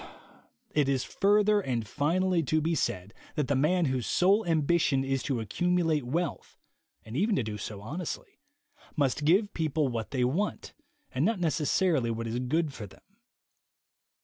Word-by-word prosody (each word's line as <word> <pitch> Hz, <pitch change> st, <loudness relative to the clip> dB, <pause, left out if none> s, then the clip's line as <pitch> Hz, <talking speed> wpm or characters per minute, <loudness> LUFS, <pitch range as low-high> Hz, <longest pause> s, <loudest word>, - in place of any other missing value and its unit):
It 145 Hz, -2 st, +2 dB
is 135 Hz, -2 st, +1 dB
further 205 Hz, +1 st, +3 dB
and 120 Hz, -, -2 dB
finally 170 Hz, -, +1 dB
to 155 Hz, +1 st, +1 dB
be 160 Hz, +2 st, 0 dB
said 105 Hz, -, -2 dB, 0.2 s
that 150 Hz, -4 st, 0 dB
the 140 Hz, -, +1 dB
man 165 Hz, +6 st, +2 dB
whose 130 Hz, -3 st, -1 dB
sole 195 Hz, +5 st, +3 dB
ambition 160 Hz, -3 st, +2 dB
is 135 Hz, -1 st, -1 dB
to 130 Hz, -3 st, -2 dB
accumulate 160 Hz, -, 0 dB
wealth 170 Hz, +4 st, -3 dB, 0.5 s
(and 110 Hz, -, -8 dB
even 205 Hz, -, +2 dB
to 130 Hz, -, +1 dB
do 105 Hz, -1 st, -5 dB
so 100 Hz, 0 st, -6 dB
honestly), 160 Hz, -, -6 dB, 0.6 s
must 145 Hz, 0 st, 0 dB
give 195 Hz, +6 st, +3 dB
people 155 Hz, -3 st, 0 dB
what 115 Hz, -2 st, -4 dB
they 130 Hz, -3 st, 0 dB
want 165 Hz, +12 st, -1 dB, 0.4 s
and 130 Hz, -, 0 dB
not 215 Hz, +2 st, +1 dB
necessarily 155 Hz, -3 st, +1 dB
what 115 Hz, 0 st, -3 dB
is 115 Hz, +2 st, -2 dB
good 150 Hz, +4 st, 0 dB
for 105 Hz, -5 st, -7 dB
them. -, -, -19 dB
150 Hz, 160 wpm, -29 LUFS, 125-175 Hz, 0.6 s, further